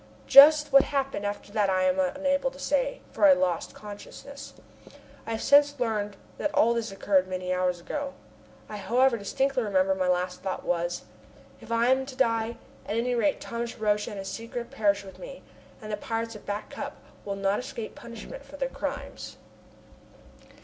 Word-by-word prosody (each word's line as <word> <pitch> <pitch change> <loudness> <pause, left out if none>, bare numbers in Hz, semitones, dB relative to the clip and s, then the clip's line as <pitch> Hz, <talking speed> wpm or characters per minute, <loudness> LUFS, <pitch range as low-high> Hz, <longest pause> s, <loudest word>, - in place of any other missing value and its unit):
Just 300 +1 +8
what 275 0 +8
happened 270 -7 -2
after 205 0 -6
that 205 -2 +1
I 185 -1 +2
am 185 0 +2
unable 275 +8 +1
to 270 - -15
say, - - -1
for - - +2
I 285 - +9
lost 180 -9 -1
consciousness. 210 +7 -10 0.7
I - - -3
have 225 - -3
since 285 0 +5
learned 210 -4 -1 0.2
that 300 - -1
all 235 +2 +4
this 230 -2 -2
occurred 195 -1 +2
many 185 0 -3
hours 180 -1 0
ago. 275 +10 -5 0.5
I 210 - -7
however 245 +5 +3
distinctly 265 +5 0
remember 195 -3 +2
that 190 - -6
my 185 - +1
last 180 0 0
thought 190 -1 -4
was: 175 0 -1 0.6
"If - - -12
I 230 +2 +3
am 265 0 +2
to 270 - -8
die, 230 -2 +1 0.3
at 210 - -2
any 245 +2 0
rate 275 +5 +1
Thomas 235 0 -5
Roch 210 -1 +1
and 210 - -6
his 195 0 -6
secret 230 +3 -6
perish 200 -2 +1
with 190 -1 -12
me - - -10 0.4
and 215 - -6
the 210 - -1
pirates 225 +2 -3
of 210 - -12
Back 205 +1 -4
Cup - - -6 0.3
will 200 -1 -4
not 195 +1 0
escape 230 -3 -6
punishment 235 - -10
for - - -12
their - - -1
crimes." - - -6
225 Hz, 185 wpm, -27 LUFS, 195-265 Hz, 0.7 s, I